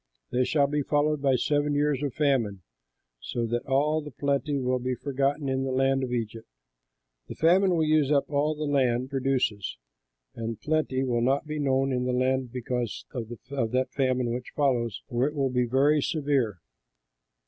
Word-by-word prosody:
They 125 +1 +2
shall 145 0 +3
be 145 +1 0
followed 150 +1 +1
by 135 -2 +3
seven 145 +3 +1
years 145 -2 +1
of 145 -4 -3
famine, 125 - +1 0.6
so 120 - -3
that 120 +1 -2
all 150 +4 +2
the 150 - -8
plenty 140 +2 -1
will 130 -1 0
be 125 +1 -2
forgotten 140 +2 -1
in 130 0 0
the 135 - -2
land 135 +1 +2
of 125 - -3
Egypt. 115 -2 -4 0.8
The - - -7
famine 180 +3 +4
will 160 -1 +2
use 155 -2 +3
up 140 -2 +3
all 150 +1 0
that 150 0 -3
the 145 - -2
land 130 -1 +1
produces; 130 - -1 0.6
and 115 -1 -5
plenty 150 0 0
will 120 -3 0
not 135 +4 +1
be 155 0 -4
known 135 -1 +1
in 125 -1 0
the 125 - 0
land 130 0 0
because 125 -2 -3
of 115 -4 -5 0.4
that 130 0 +1
famine 130 -3 0
which 125 +1 -6
follows, 120 -7 0
for 125 +1 +1
it 150 - -5
will 135 -2 0
be 125 -1 +1
very 140 +5 +3
severe. 135 - 0
135 Hz, 180 wpm, -27 LUFS, 125-145 Hz, 0.8 s, famine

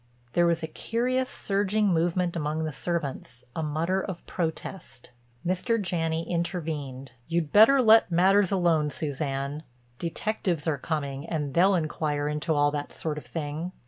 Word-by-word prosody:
There 175 0 +4
was 170 -1 +1
a - - -1
curious, 250 +9 -1
surging 205 -2 0
movement 175 +1 +1
among 155 0 -1
the 155 -1 -3
servants, 140 -6 -4
a - - -1
mutter 160 +5 0
of 185 -4 -6
protest. 160 -6 -5 0.3
Mr. 185 +6 +1
Janney 165 -4 -1
intervened: 155 -7 -3 0.2
"You'd 165 -2 -1
better 255 +6 +7
let 225 -2 +6
matters 190 +3 +4
alone, 170 -5 +2
Suzanne. 140 0 -2 0.4
Detectives 175 -2 -2
are 150 -3 0
coming 140 -2 -3
and 150 -4 -2
they'll 190 +3 +5
inquire 150 -3 -1
into 150 +2 -1
all 145 0 +3
that 145 -1 -4
sort 150 -2 -3
of - - -16
thing." 160 +3 -4
165 Hz, 145 wpm, -27 LUFS, 150-185 Hz, 0.4 s, better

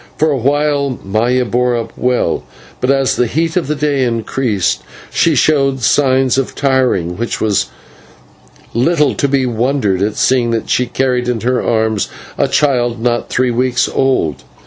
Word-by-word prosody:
For 155 0 +2
a - - +1
while 140 +1 0
Maya 120 +6 +1
bore 120 +2 0
up 115 - -5
well, 125 0 0 0.4
but 125 - -1
as 135 -1 +2
the 125 - +2
heat 165 +7 -1
of 180 -6 0
the 150 - -1
day 145 -2 0
increased 115 -3 -1 0.3
she 165 -2 +2
showed 135 -2 +2
signs 130 +1 +3
of 135 - -3
tiring, 125 -11 0
which 120 +2 -3
was 105 -3 +1 1.1
little 150 +5 +2
to 140 - 0
be 135 -1 +1
wondered 120 -5 0
at, 105 +1 0
seeing 125 -2 +2
that 115 -1 -2
she 125 - +1
carried 125 -1 -1
in 120 -3 -2
her 125 +2 0
arms 110 -3 0 0.3
a - - +1
child 130 -4 +1
not 120 0 -1
three 130 -1 +1
weeks 125 +1 +1
old. 130 - 0
125 Hz, 165 wpm, -15 LUFS, 115-135 Hz, 1.1 s, signs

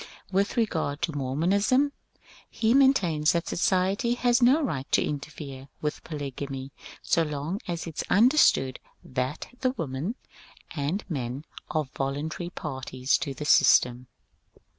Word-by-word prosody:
With 200 +5 +1
regard 160 -10 0
to 165 - -1
Mormonism 195 - +2 0.6
he 225 +1 +1
maintains 185 - +4
that 170 0 -1
society 190 +6 +1
has 245 0 +2
no 255 +6 +6
right 140 - -3
to - - +4
interfere 140 -2 -6
with 150 0 -3
polygamy 140 -2 -5 0.3
so 170 - +2
long 150 +5 -3
as 170 -2 -3
it 165 -2 -8
is - - -1
understood 220 - +4 0.2
that 130 +2 -3
the 255 -1 +1
women 160 - -3 0.6
and 155 +6 -2
men 135 -2 -4 0.2
are 155 -1 0
voluntary 145 +5 -3
parties 130 -5 -2
to 140 -4 -4
the 150 - -5
system. 125 -3 +4
155 Hz, 130 wpm, -27 LUFS, 140-200 Hz, 0.6 s, no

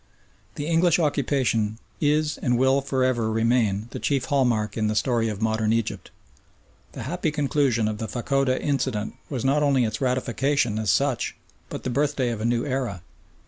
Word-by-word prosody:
The 145 - -4
English 165 +1 +3
occupation 130 -8 0 0.2
is 150 0 +1
and 125 -3 +1
will 130 +2 +3
for 135 -1 -1
ever 120 -3 +1
remain 110 -2 +1
the - - -5
chief 140 -2 -1
landmark 115 -7 +1
in 110 -2 0
the 110 - -1
story 115 -1 +1
of 105 0 -4
modern 110 -1 +1
Egypt. 115 -1 -2 0.8
The - - -6
happy 170 +3 -1
conclusion 140 -6 +1
of 105 -1 -3
the 110 - -3
Fachoda 130 +2 0
incident 130 -7 -1 0.2
was 130 -5 -3
not 140 +3 +3
only 135 -4 +3
its 110 +2 -3
ratification 130 -2 0
as 110 -2 -1
such 135 -4 +1 0.3
but - - -6
the 130 - -2
birthday 140 -2 0
of 110 -2 -4
a - - -2
new 120 +1 +1
era. 125 -10 -3
125 Hz, 175 wpm, -24 LUFS, 110-140 Hz, 0.8 s, English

